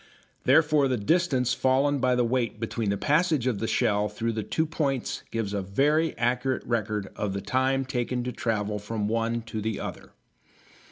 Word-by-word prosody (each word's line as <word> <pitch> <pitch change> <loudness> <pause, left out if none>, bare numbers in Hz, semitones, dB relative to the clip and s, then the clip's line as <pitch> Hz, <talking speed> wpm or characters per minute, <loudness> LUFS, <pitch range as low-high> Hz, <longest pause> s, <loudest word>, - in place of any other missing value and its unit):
Therefore 150 -3 +4
the 130 -2 0
distance 130 - +2
fallen 135 +3 +2
by 125 -1 +2
the 125 -1 +2
weight 120 -2 -1
between 115 -1 -2
the 100 - 0
passage 155 - +2
of 120 -6 0
the 115 - -2
shell 105 -1 +1
through 115 +3 -2
two 110 +9 -1
points 140 -5 -2
gives 110 -3 -3
a 100 - -1
very 145 - +1
accurate 125 +2 0
record 105 -4 -1
of 105 -2 -2
the 100 - -3
time 130 +6 +1
taken 125 -1 -2
to 125 - -3
travel 105 -3 -2
from 105 0 -3
one 115 +1 -1
to 110 -1 -5
the 110 0 -2
other. - - -7
120 Hz, 175 wpm, -27 LUFS, 105-135 Hz, -, Therefore